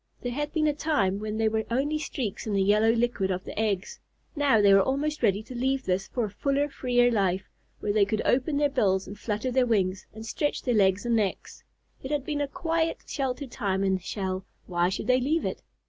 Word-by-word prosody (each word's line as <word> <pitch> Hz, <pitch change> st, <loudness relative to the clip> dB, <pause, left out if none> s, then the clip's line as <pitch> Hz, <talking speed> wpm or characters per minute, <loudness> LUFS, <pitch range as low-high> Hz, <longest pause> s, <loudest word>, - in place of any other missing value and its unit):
There 245 Hz, -, -2 dB
had 295 Hz, +4 st, -3 dB
been 315 Hz, -2 st, +1 dB
a 300 Hz, -, +3 dB
time 250 Hz, -11 st, 0 dB
when 215 Hz, 0 st, -4 dB
they 225 Hz, 0 st, +2 dB
were 220 Hz, 0 st, 0 dB
only 285 Hz, +6 st, 0 dB
streaks 245 Hz, -9 st, -4 dB
in 210 Hz, -, -1 dB
the 195 Hz, -1 st, +3 dB
yellow 210 Hz, +3 st, +4 dB
liquid 230 Hz, -4 st, 0 dB
of 185 Hz, -1 st, -2 dB
the -, -, -6 dB
eggs. 205 Hz, -4 st, -1 dB, 0.4 s
Now 285 Hz, -6 st, +3 dB
they 200 Hz, -1 st, +6 dB
were 195 Hz, -, +7 dB
almost 295 Hz, +6 st, -1 dB
ready 200 Hz, +2 st, +2 dB
to 230 Hz, -, -10 dB
leave 260 Hz, +2 st, 0 dB
this 190 Hz, +1 st, 0 dB
for 240 Hz, -3 st, -1 dB
a -, -, -5 dB
fuller, 280 Hz, +7 st, 0 dB
freer 245 Hz, -3 st, +2 dB
life, 195 Hz, -3 st, 0 dB, 0.3 s
where 205 Hz, -, 0 dB
they 205 Hz, -1 st, +4 dB
could 215 Hz, +2 st, -1 dB
open 275 Hz, +4 st, +2 dB
their 290 Hz, -1 st, +2 dB
bills 195 Hz, -8 st, +2 dB
and 200 Hz, -, -8 dB
flutter 215 Hz, +4 st, -2 dB
their 255 Hz, 0 st, +2 dB
wings, 190 Hz, -4 st, 0 dB
and 220 Hz, +1 st, -9 dB
stretch 290 Hz, +6 st, -2 dB
their 250 Hz, -, +1 dB
legs 200 Hz, 0 st, +3 dB
and 235 Hz, -1 st, +2 dB
necks. 205 Hz, -4 st, -2 dB, 0.4 s
It 265 Hz, -, -6 dB
had 290 Hz, -2 st, -1 dB
been 295 Hz, -1 st, -2 dB
a 285 Hz, -, 0 dB
quiet, 325 Hz, +2 st, -1 dB
sheltered 265 Hz, -1 st, -3 dB
time 195 Hz, -5 st, -1 dB
in 190 Hz, -1 st, +2 dB
the 185 Hz, -, -1 dB
shell; 190 Hz, 0 st, -3 dB, 0.2 s
why 175 Hz, -1 st, +1 dB
should 190 Hz, -, -3 dB
they 255 Hz, 0 st, +3 dB
leave 310 Hz, +6 st, +1 dB
it? -, -, -3 dB
230 Hz, 230 wpm, -27 LUFS, 200-275 Hz, 0.4 s, were